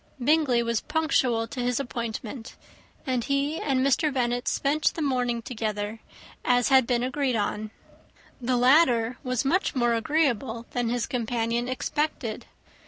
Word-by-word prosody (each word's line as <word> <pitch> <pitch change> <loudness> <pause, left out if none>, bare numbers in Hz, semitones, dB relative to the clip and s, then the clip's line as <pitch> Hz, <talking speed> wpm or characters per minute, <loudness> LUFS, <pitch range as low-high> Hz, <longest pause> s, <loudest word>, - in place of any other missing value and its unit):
Bingley 265 -3 +3
was 235 -1 0
punctual 270 -7 +1
to 255 - -7
his 245 +1 0
appointment; 235 -2 -5 0.5
and 255 -3 0
he 280 +4 0
and 265 -2 +1
Mr. 290 +3 +2
Bennet 245 -2 -1
spent 295 +2 +1
the 330 - -3
morning 245 -4 0
together, 215 -2 -3 0.4
as 245 0 +3
had 265 -3 +5
been 245 -1 +1
agreed 260 -1 0
on. 210 0 -2 0.7
The 250 +1 +1
latter 250 -3 +4
was 255 -1 -1
much 360 +5 +1
more 240 -2 +2
agreeable 235 -2 0
than 245 -2 -1
his 240 -1 0
companion 235 0 -1
expected. 255 -3 -2
245 Hz, 140 wpm, -26 LUFS, 235-275 Hz, 0.7 s, had